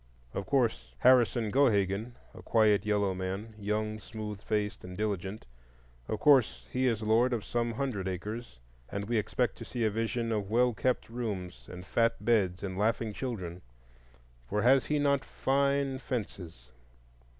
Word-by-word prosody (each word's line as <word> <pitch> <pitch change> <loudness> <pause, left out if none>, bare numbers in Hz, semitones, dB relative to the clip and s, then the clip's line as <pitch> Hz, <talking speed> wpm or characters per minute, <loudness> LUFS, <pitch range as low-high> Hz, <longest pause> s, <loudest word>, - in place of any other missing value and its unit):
Of 95 - -4
course 125 -3 0
Harrison 120 -3 +4
Gohagen,—a 110 -3 0
quiet 105 -2 +3
yellow 100 -2 +2
man, 95 +4 -4
young, 105 +1 -2
smooth 105 -1 -7
faced, 105 -1 -2
and 90 0 -8
diligent,—of 60 - -6
course 120 - +4
he 130 0 +1
is 115 -3 0
lord 115 +4 +3
of 115 -4 -2
some 120 -1 -1
hundred 110 -7 -2
acres, 105 - -5 0.3
and 100 0 -4
we 120 0 +1
expect 120 +4 -1
to - - -6
see 120 -2 -3
a 110 - +2
vision 115 +2 -1
of 105 -3 -1
well 120 +2 +3
kept 125 +3 0
rooms 105 -7 -5
and 90 0 -8
fat 115 0 +1
beds 100 -6 +2
and 95 -1 -4
laughing 110 0 +1
children. 95 -9 -5 0.9
For 105 +1 0
has 130 +2 +5
he 150 - +1
not 140 -1 +2
fine 140 0 0
fences? 90 - -6
110 Hz, 150 wpm, -30 LUFS, 95-120 Hz, 0.9 s, has